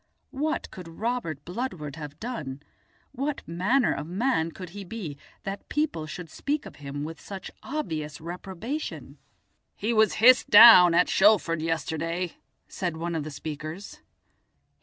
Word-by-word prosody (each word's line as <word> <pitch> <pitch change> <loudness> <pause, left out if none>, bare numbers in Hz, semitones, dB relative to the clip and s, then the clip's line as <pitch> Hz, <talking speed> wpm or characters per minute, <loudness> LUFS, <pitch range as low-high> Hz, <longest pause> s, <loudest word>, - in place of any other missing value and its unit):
What 310 +4 -2
could 180 -3 -9
Robert 165 - -3
Bludward 175 - -4
have 150 -1 -9
done, 150 - -5 0.5
what 280 +3 -4
manner 205 +10 +2
of 150 - -5
man 185 -3 0
could 180 0 -9
he 200 +3 -8
be, 185 -6 -6 0.3
that 195 +1 -6
people 295 - -1
should 170 +3 -7
speak 290 - -3
of - - -11
him 145 0 -6
with 160 +1 -7
such 195 -1 -8
obvious 160 - -4
reprobation? 190 - -6 0.6
"He 220 +3 -1
was 220 -1 +4
hissed 250 +3 +6
down 205 -6 +10
at 180 - +5
Shoalford 190 -5 +4
yesterday," 165 +2 -2 0.3
said 175 -4 -3
one 170 +1 -3
of 160 -2 -2
the 155 - -6
speakers. 155 +5 -7
180 Hz, 140 wpm, -27 LUFS, 160-225 Hz, 0.6 s, down